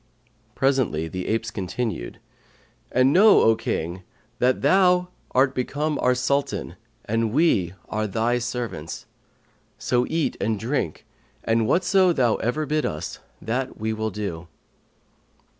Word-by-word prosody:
Presently 130 Hz, -, +1 dB
the 90 Hz, +2 st, -5 dB
apes 110 Hz, 0 st, -1 dB
continued, 95 Hz, -, -4 dB, 0.7 s
'And 130 Hz, +2 st, +3 dB
know, 210 Hz, +3 st, +7 dB
O 115 Hz, -, +5 dB
King, 90 Hz, -5 st, -3 dB, 0.4 s
that 130 Hz, +2 st, +2 dB
thou 180 Hz, +3 st, +4 dB, 0.2 s
art 130 Hz, +1 st, +3 dB
become 145 Hz, +4 st, -2 dB
our 125 Hz, 0 st, +3 dB
Sultan 140 Hz, +3 st, -1 dB, 0.3 s
and 115 Hz, 0 st, 0 dB
we 105 Hz, -, +2 dB
are 110 Hz, 0 st, -2 dB
thy 115 Hz, +4 st, 0 dB
servants; 120 Hz, -10 st, -5 dB, 0.7 s
so 125 Hz, 0 st, 0 dB
eat 165 Hz, -1 st, 0 dB
and 110 Hz, -1 st, 0 dB
drink, 115 Hz, -, -2 dB, 0.4 s
and 115 Hz, -1 st, +1 dB
whatso 185 Hz, -, +3 dB
thou 120 Hz, -7 st, +2 dB
ever 150 Hz, +7 st, -1 dB
bid 150 Hz, +1 st, 0 dB
us, 75 Hz, 0 st, -4 dB, 0.2 s
that 125 Hz, +4 st, -3 dB
will 110 Hz, 0 st, -2 dB
we -, -, -1 dB
do.' 90 Hz, -5 st, -5 dB
120 Hz, 125 wpm, -24 LUFS, 110-140 Hz, 0.7 s, know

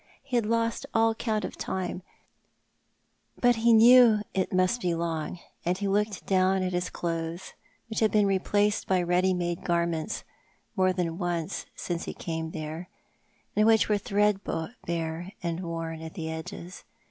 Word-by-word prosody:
He 270 Hz, -2 st, -4 dB
had 230 Hz, -3 st, +2 dB
lost 230 Hz, 0 st, 0 dB
all 225 Hz, 0 st, +4 dB
count 220 Hz, -1 st, -1 dB
of -, -, -6 dB
time, 185 Hz, -1 st, -3 dB, 1.4 s
but 245 Hz, -1 st, +4 dB
he 230 Hz, +1 st, +4 dB
knew 235 Hz, 0 st, +8 dB, 0.2 s
that 190 Hz, -1 st, 0 dB
it -, -, -28 dB
must 185 Hz, +6 st, +2 dB
be 175 Hz, -3 st, 0 dB
long 165 Hz, 0 st, -3 dB
— -, -, -42 dB
and 180 Hz, +1 st, 0 dB
he 200 Hz, +1 st, -2 dB
looked 205 Hz, 0 st, 0 dB
down 190 Hz, 0 st, +2 dB
at 185 Hz, 0 st, -2 dB
his 180 Hz, 0 st, -1 dB
clothes, 165 Hz, +1 st, -4 dB, 0.3 s
which 220 Hz, -, -3 dB
had 220 Hz, -, +4 dB
been 210 Hz, -1 st, +4 dB
replaced 205 Hz, +2 st, +1 dB
by 185 Hz, -2 st, +2 dB
ready 180 Hz, +2 st, +2 dB
made 175 Hz, -1 st, -2 dB
garments 170 Hz, -2 st, -1 dB, 0.5 s
more 185 Hz, -2 st, +3 dB
than 175 Hz, -2 st, -2 dB
once 175 Hz, -3 st, -2 dB
since 170 Hz, -1 st, -3 dB
he -, -, -6 dB
came 160 Hz, -1 st, -4 dB
there, 160 Hz, +3 st, -6 dB, 0.7 s
and 215 Hz, +1 st, +4 dB
which 225 Hz, -1 st, +6 dB
yet -, -, -8 dB
were 210 Hz, -, +3 dB
threadbare 185 Hz, -4 st, -1 dB
and 170 Hz, -1 st, -2 dB
worn 165 Hz, -2 st, -4 dB
at 160 Hz, 0 st, -8 dB
the 160 Hz, -1 st, -4 dB
edges. 170 Hz, +3 st, -7 dB
185 Hz, 170 wpm, -28 LUFS, 170-210 Hz, 1.4 s, knew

